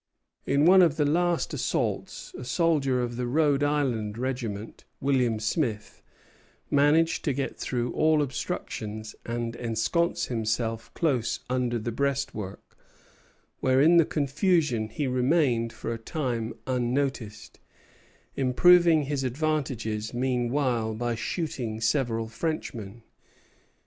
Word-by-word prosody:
In 140 +2 +3
one 185 +2 +8
of 165 -3 +3
the 150 - +2
last 175 +3 +1
assaults - - -2
a - - -7
soldier 135 -1 +1
of 120 -1 -4
the 125 -1 -2
Rhode 145 +1 +2
Island 125 -8 0
regiment, 120 -5 -4 0.2
William 125 -5 +1
Smith, 110 -2 -2 0.7
managed 150 +3 +3
to 145 - +1
get 140 +1 -3
through 120 -1 -2
all 155 -1 +3
obstructions 115 -7 -5
and 115 0 -3
ensconce 120 +9 0
himself 115 -1 -2
close 130 -9 0
under 125 -2 0
the 115 +1 -3
breastwork, 130 -6 -3 0.8
where 130 0 +3
in 165 +5 +6
the 165 - +6
confusion 150 - +1
he 140 +6 -3
remained 125 -2 +2
for 115 +1 -5
a 115 - -6
time 120 -4 -3
unnoticed, 125 -3 -2 0.8
improving 165 +4 +5
his 140 -1 -2
advantages 125 -6 -2
meanwhile 125 -2 0
by 120 +1 -1
shooting 120 -3 -3
several 115 -1 0
Frenchmen. 115 -5 -4
125 Hz, 115 wpm, -27 LUFS, 115-150 Hz, 0.8 s, one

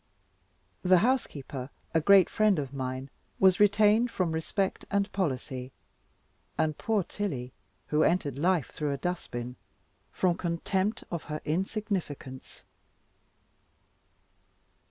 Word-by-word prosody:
The 185 0 +5
housekeeper, 145 - -2 0.2
a 160 - +3
great 195 +2 +7
friend 215 -3 +3
of 140 -2 -3
mine, 130 0 -4 0.3
was 190 -1 +5
retained 210 +3 +5
from 185 -7 -1
respect 185 +5 -1
and 200 0 0
policy, 130 -7 -3 0.9
and 155 -1 +1
poor 215 +2 0
Tilly 140 -11 -4 0.4
(who 150 +1 +2
entered 150 -6 +1
life 175 -3 +1
through 150 -2 -2
a - - -3
dust 180 +4 -3
bin) 120 +1 -5 0.5
from 180 -2 +1
contempt 190 +5 -1
of 170 -3 -4
her 150 0 -4
insignificance. 175 -6 -3
170 Hz, 115 wpm, -29 LUFS, 140-200 Hz, 0.9 s, great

